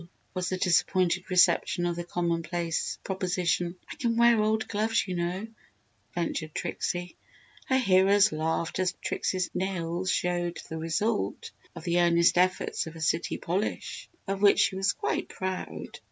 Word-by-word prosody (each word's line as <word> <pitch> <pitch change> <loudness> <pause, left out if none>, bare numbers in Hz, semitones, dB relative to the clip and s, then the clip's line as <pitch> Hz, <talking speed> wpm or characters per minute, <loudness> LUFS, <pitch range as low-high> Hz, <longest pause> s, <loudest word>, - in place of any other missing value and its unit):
was 185 -1 -2
the 185 - -1
disappointed 180 0 +2
reception 180 -1 +3
of 175 -1 0
the 175 - -4
commonplace 170 -1 -2
proposition. 180 -2 -1
"I - - -8
can 230 -2 0
wear 235 -2 +5
old 220 +1 +1
gloves, 220 0 0
you 185 - -3
know," 175 +4 -2 0.7
ventured 160 -2 -3
Trixie. 175 0 -3 0.5
Her 260 - +3
hearers 200 -2 +5
laughed 160 +3 -1
as 185 -1 +1
Trixie's 185 -1 -1
nails 180 -1 -2
still 180 - +1 0.2
showed 175 - -6
the 160 - -5
result 200 +7 -1 0.2
of - - -8
the 175 -1 +2
earnest 170 0 +4
efforts 185 -2 +1
of 160 - -9
a - - -9
city 160 +1 0
polish, 185 +5 -3 0.2
of 195 0 -2
which 205 -1 +6
she - - +2
was 195 +1 +2
quite - - -2
proud. 185 0 -5
180 Hz, 155 wpm, -28 LUFS, 170-195 Hz, 0.7 s, which